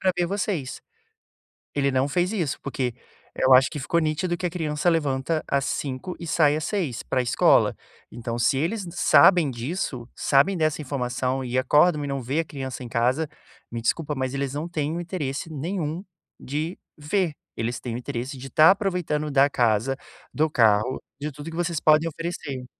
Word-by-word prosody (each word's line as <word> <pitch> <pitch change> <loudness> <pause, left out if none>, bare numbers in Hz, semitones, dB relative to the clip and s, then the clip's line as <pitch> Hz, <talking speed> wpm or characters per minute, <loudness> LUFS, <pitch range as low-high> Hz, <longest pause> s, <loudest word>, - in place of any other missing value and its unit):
pra 185 -1 +2
ver 175 -1 +1
vocês. 185 -7 -2 1.0
Ele 140 -1 +2
não 130 +2 +1
fez 180 +7 0
isso 170 -10 -1
porque 130 -3 -2 0.4
eu 130 - +4
acho 130 +1 +6
que 150 - -6
ficou 170 +5 +1
nítido 165 +3 0
que 180 - -4
a - - +1
criança 160 -1 0
levanta 155 -1 0
às 140 -1 +1
05:00 140 +6 -3
e 170 - -6
sai 150 -2 +3
às 155 - -4
06:00 160 - -2
pra 130 - 0
escola. 120 - +3 0.4
Então 120 0 -4
se 120 +3 +3
eles 190 +8 -1
sabem 175 -8 +5
disso, 125 -1 -4
sabem 150 +8 +3
dessa 155 -1 0
informação 130 -1 -2
e 125 +1 -2
acordam 150 +4 +4
e - - -4
não 140 -1 -2
vê 135 +7 -1
a 165 - -8
criança 130 -3 -6
em 120 - -8
casa, 130 +7 +1 0.4
me 115 -1 -4
desculpa 150 +5 0
mas 130 0 -2
eles 140 -1 -2
não 150 +4 -3
têm 155 -1 -2
o - - -2
interesse 165 -4 -4
nenhum 160 +2 -3 0.4
de 155 +6 -3 0.2
ver, 160 +2 0 0.2
eles 115 +1 -2
têm 120 -2 -5
o - - -2
interesse 125 +2 -5
de 130 - -8
estar 155 +6 +6
aproveitando 180 -7 -1
da 140 +1 +5
casa, 120 +1 +1 0.4
do 155 +1 +2
carro, 110 0 +3 0.2
de 150 0 -3
tudo 145 +4 -8
que 165 - -8
vocês 170 -2 -1
podem 155 +2 +4
oferecer. 145 -6 -5
145 Hz, 185 wpm, -25 LUFS, 130-165 Hz, 1.0 s, acho